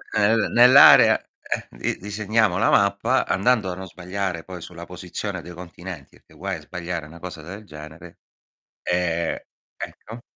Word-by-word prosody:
E, 110 +1 +4
beh, 110 - +1
nell'area, 125 +3 +8 0.2
eh, - - -4
di - - -3
disegniamo 105 0 0
la - - +2
mappa, 100 +6 +2
andando 100 -1 +1
a - - -5
non 95 +1 -8
sbagliare 90 -1 -4
poi 90 -2 -9
sulla 85 +1 -9
posizione 90 +2 -6
dei 90 +1 -10
continenti, 85 -3 -10
perché - - -24
guai 95 -1 -4
a - - -13
sbagliare 85 0 -5
una 85 +2 -13
cosa 90 -3 -8
del 100 +7 -10
genere, 80 +1 -12 0.6
e 85 -2 -1 0.3
Ecco. 115 +2 -9
90 Hz, 155 wpm, -23 LUFS, 85-100 Hz, 0.6 s, nell'area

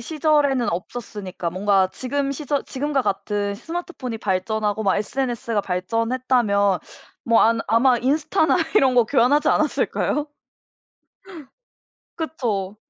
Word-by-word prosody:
시절에는 290 -2 +1
없었으니까. 185 -1 -5
뭔가 190 +1 +2
지금 275 +2 -2
시절 285 0 -2
지금과 280 0 -1
같은 205 -1 -2
스마트폰이 325 - -6
발전하고 210 +2 -1
막 195 -3 +2
SNS가 235 0 -2
발전했다면 205 0 0 0.4
뭐 230 -1 +4
안 230 0 +3
아마 245 +2 +4
인스타나 300 +7 +1 0.2
이런 265 -10 +4
거 240 - +6
교환하지 265 +4 +3
않았을까요? 300 0 0 1.9
그쵸. 220 - -3
235 Hz, 285 characters per minute, -22 LUFS, 205-275 Hz, 1.9 s, 거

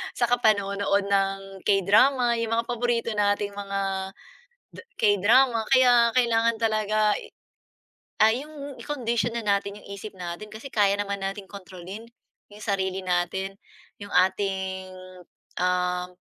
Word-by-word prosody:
'tsaka 245 0 +2
panonood 200 -1 +2
ng 195 -1 -1
K-drama, 235 +6 +3
yung 230 -1 -2
mga 230 0 0
paborito 240 -1 -1
nating 205 0 0
mga 195 -1 -3 0.9
K-drama 225 +4 +4
kaya, 245 -2 +5
kailangan 230 -2 +2
talaga 215 -1 +1
i - - -11 0.9
ah, 220 +1 +6
'yong 285 +1 -7
i-condition 235 -5 -1
na - - -2
natin 200 0 0
'yong - - -15
isip 200 +1 -8
natin, 175 +4 -6
kasi 230 +5 -9
kaya 200 -3 +2
naman 200 -1 -3
nating 195 0 -5
kontrolin, 190 +2 -9 0.5
'yong 210 - -13
sarili 190 -2 -1
natin, 185 +2 -1 0.4
'yong 205 - -8
ating, 190 0 0 0.7
um, 180 0 0
205 Hz, 120 wpm, -25 LUFS, 195-230 Hz, 0.9 s, ah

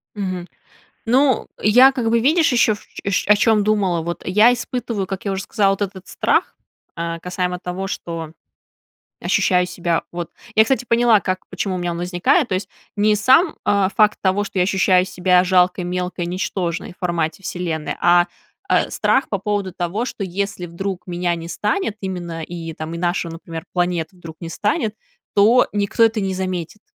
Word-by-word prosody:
Мгм. 185 -3 -4 0.6
Ну, 260 +2 +3
я, 250 +6 +7
как 245 -4 -1
бы, 230 +1 +3
видишь, 305 +6 +3
ещё, 235 -3 +3
ш - - -15 0.3
шё 200 +1 +1
о - - +8
чем 210 0 +3
думала. 200 -5 +1
Вот 170 +1 -5
я 210 +6 +5
испытываю, 240 -5 -3
как 195 +1 -6
я 200 - 0
уже 190 0 -3
сказала, 200 -3 +2
от 195 - -7
этот 195 -1 -4
страх, - - 0 0.4
э, 170 0 -3
касаемо 180 0 -2
того, 180 +2 -4
что 165 -4 -5 0.9
ощущаю 180 -1 +2
себя, 175 -2 -1
вот 175 -1 -5 0.2
Я, 220 - +6
кстати, 250 +1 0
поняла, 235 -2 +4
как, 185 -1 -3
почему 185 +1 -3
у - - -3
меня 175 -1 -2
он 170 - -5
возникает, 180 - +1
то - - -1
есть, 185 +1 -3 0.3
не 210 +1 +3
сам, 265 - +4
а, 200 -2 +3
факт 215 -1 +4
того, 195 +2 +1
что 195 - -5
я 180 - +4
ощущаю 185 -1 +3
себя 180 -1 +3
жалкой, 180 0 +3
мелкой, 180 0 -3
ничтожной 175 -1 -3
в - - -25
формате 170 -1 -2
Вселенной, 170 -4 -3
а, 175 0 +5 0.4
а - - +2
страх 265 - +1
по 200 - 0
поводу 200 -1 -2
того, 180 +7 -2
что 235 - -6
если, 190 0 -3
вдруг, 180 +1 -5
меня 175 -1 -1
не 165 0 -7
станет 210 - -1
именно, 175 -4 -5
и 165 0 -6
там, 155 +1 -6
и - - -5
наша, 175 0 -1
ну 165 - -7
например, 165 -1 -8
планета 175 -1 -1
вдруг 165 -2 -10
не 170 - -6
станет, 210 +3 -1 0.4
то, 225 +5 +5
никто 205 +2 0
это 225 -1 +2
не 190 -1 -1
заметит. 185 +1 -4
185 Hz, 185 wpm, -20 LUFS, 175-210 Hz, 0.9 s, о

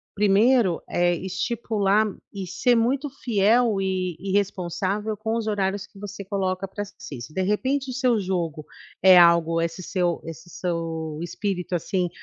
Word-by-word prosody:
1º, 210 0 +3
eh, 175 0 +2
estipular 205 +2 0 0.3
e 195 -2 -5
ser 245 +7 +2
muito 260 +5 +1 0.2
fiel 220 0 +3
e 185 -3 -1
e 195 +1 -4
responsável 200 +2 -1
com 220 +2 -2
os 230 - -2
horários 200 -1 -1
que 200 - -17
você 200 0 -7
coloca 190 -1 -2
para 205 +2 -5
si. 200 -10 -10
Se 120 - -9
de 190 - -1
repente 260 +7 0
o - - -5
seu 250 -3 +2
jogo 170 -6 -2 0.4
é 190 -1 +9
algo 170 -1 +5
esse 170 +2 -3
seu 175 -2 0
esse 165 +2 -9
seu 165 -3 -3
espírito 180 0 -3
assim, 180 +1 -1
195 Hz, 155 wpm, -24 LUFS, 175-210 Hz, 0.4 s, é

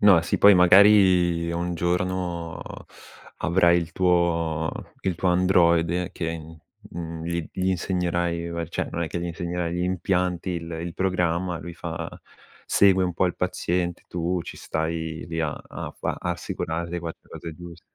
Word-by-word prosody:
No, 100 -5 +7
sì, - - -1
poi 100 0 +8
magari 90 -2 +6
un 85 +1 -2
giorno 90 -1 -2 0.8
avrai 85 0 +4
il 85 -2 -4
tuo 85 -3 +1 0.3
il 95 - -1
tuo 90 - 0
androide 90 -1 +3
che, 85 -1 -3
mhmm, 80 0 -12 0.3
mhmm, 80 -1 -6
gli 85 -1 -3
gli 95 0 -2
insegnerai, 85 -2 -1
beh, 85 -1 -4
cioè, - - -3
non 85 - -2
è 80 - -2
che 85 - -4
gli 85 - -3
insegnerai, 85 0 -3
gli 90 - -1
impianti, 90 0 0
il 85 -1 -4
il 85 0 -5
programma, 90 -2 0
lui 85 0 -8
fa - - -5 0.6
segue 95 -2 +4
un 90 - -1
po' 90 - +2
il 90 - -3
paziente, 90 0 -1
tu 90 +1 -1
ci - - -9
stai 80 0 -3
lì 80 -1 -3
a 80 -3 0
a - - -8
fa - - -2
a 90 - -2
assicurarti 85 0 -4
che 90 - -1
fa 85 - -6 0.2
le - - -26
cose 85 -2 -8
giuste. 85 0 -11
85 Hz, 170 wpm, -25 LUFS, 85-90 Hz, 0.8 s, poi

